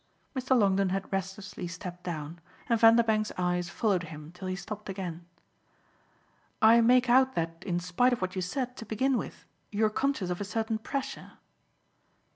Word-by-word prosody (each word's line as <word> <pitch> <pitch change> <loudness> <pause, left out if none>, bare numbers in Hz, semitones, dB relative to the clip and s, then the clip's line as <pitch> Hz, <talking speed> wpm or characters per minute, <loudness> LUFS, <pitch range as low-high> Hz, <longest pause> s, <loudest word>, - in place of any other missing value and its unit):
Mr. 260 0 +2
Longdon 195 -3 +3
had 195 +1 -3
restlessly 190 -1 -4
stepped 180 0 -8
down, 165 -1 -5 0.3
and 230 -2 +2
Vanderbank's 225 -2 +5
eyes 180 -1 0
followed 195 -1 +1
him 155 -1 -10
till 185 +2 -8
he 185 - -2
stopped 210 +2 -7
again. 175 -3 -5 1.3
"I 230 +2 +7
make 250 +2 +5
out 260 +2 +4
that 165 0 -3
in 175 -2 -1
spite 180 +9 +2
of 245 - 0
what 185 0 -3
you 185 - -1
said 250 +7 -3
to - - -6
begin 260 +5 +1
with - - -5 0.3
you're 215 +1 +2
conscious 245 -7 0
of 180 - -3
a - - 0
certain 220 +2 -2
pressure." 275 +4 -5
200 Hz, 165 wpm, -29 LUFS, 180-230 Hz, 1.3 s, I